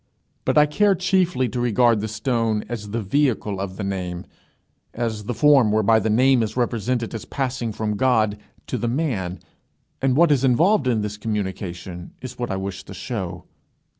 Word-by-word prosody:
But - - +1
I 150 - +7
care 200 +7 +3
chiefly 180 -7 +1
to 125 - -4
regard 120 -1 +3
the 110 - -2
stone 110 0 -1
as 110 -4 -6
the 115 +1 -2
vehicle 110 -4 0
of 95 -1 -5
the 105 - -4
name, 90 -3 -4 0.7
as 110 -3 -3
the 125 - -2
form 135 -3 +5
whereby 110 +1 +4
the 110 - -1
name 130 +3 +4
is 110 +1 -3
represented 120 0 -1
as 115 - -5
passing 130 -4 -3
from 105 0 -2
God 110 -4 +2 0.3
to - - -3
the 120 - -1
man, 115 - -2 0.6
and 130 -1 +2
what 170 -1 +5
is 135 -2 +3
involved 145 - +3
in 115 -4 +2
this 105 0 -4
communication 95 -4 -5
is 130 -1 -9
what 120 - -2
I 95 - -1
wish 95 0 -5
to 95 - -9
show. 95 -4 -5
115 Hz, 180 wpm, -22 LUFS, 105-130 Hz, 0.7 s, I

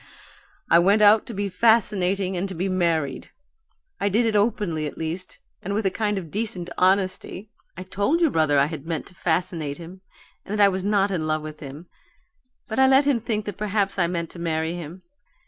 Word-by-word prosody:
I 170 - +6
went 200 +5 +4
out 210 +1 +6
to 235 - -6
be 200 +1 -1
fascinating 195 -2 +2
and 185 0 -3
be 185 +3 -1
married. 170 -7 -1 0.7
I 200 - +1
did 225 +5 +2
it 225 -2 0
openly, 205 -8 0
at - - -9
least, 165 +3 -5 0.2
and 200 +2 -3
with 215 0 -1
a 190 - +2
kind 210 0 -1
of 170 -5 -6
decent 190 -5 -3
honesty. 190 +2 0 0.3
I 185 - -6
told 205 - 0
your 330 -4 +3
brother 155 -3 +2
I 140 - +5
had 155 0 -7
meant 165 -2 -3
to - - -19
fascinate 165 -4 -2
him 175 +3 -11 0.4
and 210 +2 -4
that 205 - +5
I 200 - +7
was 190 -1 -3
not 200 0 +2
in 165 -4 -2
love 155 0 -1
with 155 0 -8
him, 145 +3 -9 0.8
but 220 - -3
I 265 - +6
let 270 +2 +5
him 280 -4 +2
think 215 -2 -3
that 205 -3 -6
perhaps 200 -1 -1
I 170 - +3
meant 170 -2 -3
to 175 - -11
marry 160 -1 -1
him. 175 +1 -8
185 Hz, 205 wpm, -24 LUFS, 165-205 Hz, 0.8 s, I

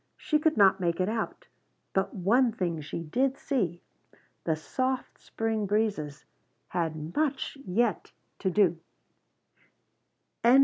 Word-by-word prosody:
She 305 - +1
could 315 +1 +2
not 195 -2 +6
make 170 -1 0
it 185 - +2
out. 230 - -3 0.5
But 190 0 +1
one 230 +7 +3
thing 175 -6 -2
she 155 +3 -5
did 260 - +1
see 180 - -1 0.6
the 160 - +2
soft 255 +11 -2
spring 220 -2 -1
breezes 200 -9 -1 0.4
had 160 -2 -2
much 290 -3 0
yet 220 +4 +1 0.3
to 190 - +1
do. 180 -3 +3
195 Hz, 120 wpm, -29 LUFS, 170-240 Hz, 0.6 s, not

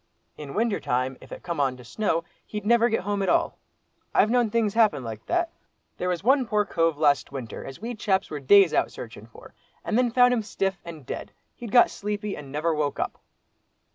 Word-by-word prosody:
In 145 -2 -8
winter 225 -1 +1
time, 130 +2 -1
if - - -15
it - - -8
come 170 -3 -4
on 130 -3 +1
to 125 - -13
snow, 165 - -1 0.2
he'd 210 -1 -5
never 235 +1 +4
get 225 - 0
home 200 +1 -2
at 195 - 0
all. - - +1 0.6
I've 215 - +4
known 240 -2 +3
things 220 -2 +1
happen 215 - +3
like 110 -2 -7
that. 345 -1 0 0.5
There 180 - -2
was 180 0 -2
one 260 +1 +3
poor 210 -1 +1
cove 165 -4 +1
last 145 -3 +2
winter, 130 -5 -6
as 135 - -9
we 235 +3 -5
chaps 200 -3 0
were 150 - -4
days 185 +5 +6
out - - +1
searchin' 110 -2 -10
for, 115 - -15 0.3
and 220 - +1
then 250 -1 +3
found 250 +1 +5
him 235 - +1
stiff, 195 -2 -2
and 160 -5 -10
dead—he'd 235 - -9
got 240 - +6
sleepy, 210 0 -4
and 140 -2 -10
never 155 +3 0
woke 150 -2 -1
up!" - - -3
195 Hz, 210 wpm, -25 LUFS, 145-225 Hz, 0.6 s, days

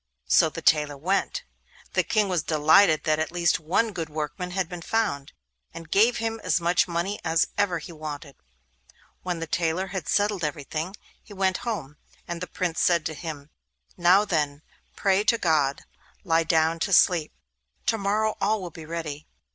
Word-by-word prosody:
So 160 - +4
the 165 +1 -8
tailor 150 -2 +3
went. 185 +7 -1 0.5
The - - +3
King 215 -2 +1
was 180 -4 0
delighted 155 +2 +4
that 155 -1 +1
at 160 - -2
least 175 -1 +1
one 190 +8 0
good 165 -3 -4
workman 155 +4 -4
had 185 -1 -1
been 175 0 -7
found, 165 -9 -1 0.4
and 165 -1 -10
gave 225 +5 +4
him 225 -1 -3
as - - +2
much 175 +2 +2
money 175 +4 -2
as 165 -1 +2
ever 200 -4 +1
he 160 +2 -9
wanted. 155 -3 -7 0.9
When 180 -2 -3
his 165 -1 -5
tailor 170 +2 0
had 190 -4 -5
settled 205 -3 +1
everything, 155 +5 -3 0.3
he 210 - -14
went 190 -1 +1
home. 165 - -5 0.3
And 170 0 -5
the 180 - -4
Prince 175 -2 -2
said 170 -3 +3
to 160 - -2
him: 150 -2 -7 0.4
'Now 180 +4 +4
then, 150 -5 -1 0.3
pray 195 0 +2
to 230 - +4
God, 150 -7 +1
and - - -30
lie 165 0 +3
down 160 0 +2
to 195 +4 -1
sleep; 170 -4 +4 0.5
to 225 - +1
morrow 215 +2 0
all 215 +2 +2
will 180 -3 -7
be 160 0 -11
ready. 155 -3 -5
170 Hz, 180 wpm, -25 LUFS, 155-195 Hz, 0.9 s, So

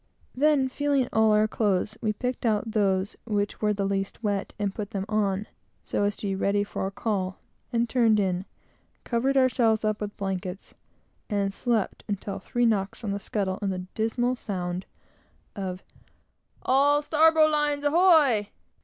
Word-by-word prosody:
Then, 285 0 +3
feeling 280 0 +1
of 245 - -7
all 220 -1 +4
our 210 0 +4
clothes, 210 -1 0
we 215 - +1
picked 250 +4 -4
out 220 -1 0
those 195 -2 +1
which 205 -2 -2
were 210 -1 +2
the 200 -1 -1
least 195 +3 -2
wet, 205 -2 -1
and 200 -2 -1
put 205 -1 -5
them 195 -3 -3
on, 210 -2 0 0.4
so 205 - -1
as 205 0 0
to - - -8
be 195 - 0
ready 200 +1 +1
for 200 - -3
a - - -5
call, 195 -3 -2 0.3
and 235 0 +1
turned 225 -3 +3
in, 185 -1 0 0.6
covered 265 +3 0
ourselves 230 -4 +3
up 215 0 -1
with 205 -1 -5
blankets, 190 -1 -4 0.6
and 200 -2 0
slept 230 -2 -1
until 200 -1 -4
three 240 0 0
knocks 200 -1 0
on 210 - -2
the 200 - -2
scuttle 195 -2 -2
and 200 -1 0
the 180 -1 -4
dismal 240 +3 0
sound 180 -5 -4 0.7
of 190 -2 -5 0.8
"All 285 +3 +3
starbowlines 305 -2 +3
ahoy! 290 - +4
215 Hz, 160 wpm, -26 LUFS, 195-245 Hz, 0.8 s, all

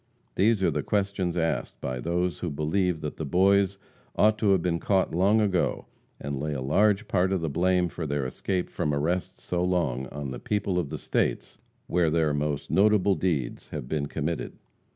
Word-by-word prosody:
These 105 0 +2
are 85 - +3
the 75 0 -1
questions 100 -1 -1
asked 80 -1 -1
by 65 -1 -3
those 85 +4 -1
who 90 - -2
believe 80 +3 0
that 75 - -5
the - - -4
Boys 95 +5 +3 0.4
ought 110 +1 +3
to 105 - +2
have 95 -3 +4
been 85 -2 0
caught 95 -2 +1
long 100 +6 +3
ago, 95 -5 0 0.3
and 70 -1 -4
lay 75 +1 -2
a 70 - -3
large 100 - +2
part 95 0 +1
of 95 -3 0
the 80 -3 -2
blame 90 +3 +2
for 80 -1 -5
their 70 -1 -1
escape 90 +8 -2
from 75 -1 -1
arrest 85 +5 -1
so 90 0 -2
long 80 -8 0
on 70 0 -6
the - - -6
people 100 -3 -1
of 85 - -3
the - - -4
states - - -2 0.3
where 85 -2 +2
their 80 -2 +2
most 75 0 -2
notable 100 0 +4
deeds 80 -11 -2
have - - -6
been 70 0 -1
committed. 80 +3 -3
90 Hz, 195 wpm, -27 LUFS, 75-95 Hz, 0.4 s, have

